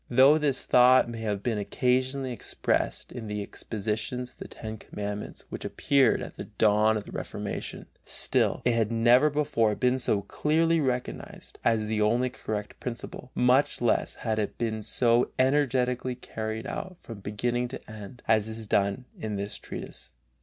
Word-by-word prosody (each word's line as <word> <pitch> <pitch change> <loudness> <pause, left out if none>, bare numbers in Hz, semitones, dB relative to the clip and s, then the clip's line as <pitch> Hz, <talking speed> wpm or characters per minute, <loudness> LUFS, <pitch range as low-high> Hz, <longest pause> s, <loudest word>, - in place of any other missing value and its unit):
Though 135 +5 +6
this 145 -3 0
thought 125 0 +6
may 115 -1 -6
have 105 -3 -2
been 115 -4 0
occasionally 130 +4 0
expressed 120 - -1
in 115 -3 -7
the 105 -1 -3
expositions 110 +5 -4
of - - -21
the - - -7
Ten 110 0 -7
Commandments 105 0 -6
which - - -6
appeared 135 -4 +2
at - - -9
the - - -5
dawn 110 +1 +3
of 105 - -4
the - - -12
Reformation, - - -5 0.2
still - - +3
it 120 - +4
had 115 -1 +1
never 120 +5 +5
before 140 -8 +1
been 125 +2 +1
so 105 -5 +1
clearly 165 +8 +1
recognized 125 -3 -4
as 110 -2 +2
the 110 0 -1
only 120 +4 +2
correct 105 -4 -5
principle, 125 +1 -6
much 125 +3 +3
less 120 - +1
had 110 -2 -2
it 105 - -3
been 110 -2 -2
so 120 +3 +2
energetically 130 -2 +1
carried 110 -2 -5
out 185 -2 -5
from 115 -3 -9
beginning 120 +5 -1
to 125 - -9
end, 110 +3 -10
as 110 -1 +3
is 110 0 -5
done 100 +4 +1
in 110 -1 -3
this 100 +1 -3
treatise. - - -8
120 Hz, 165 wpm, -27 LUFS, 110-130 Hz, 0.2 s, Though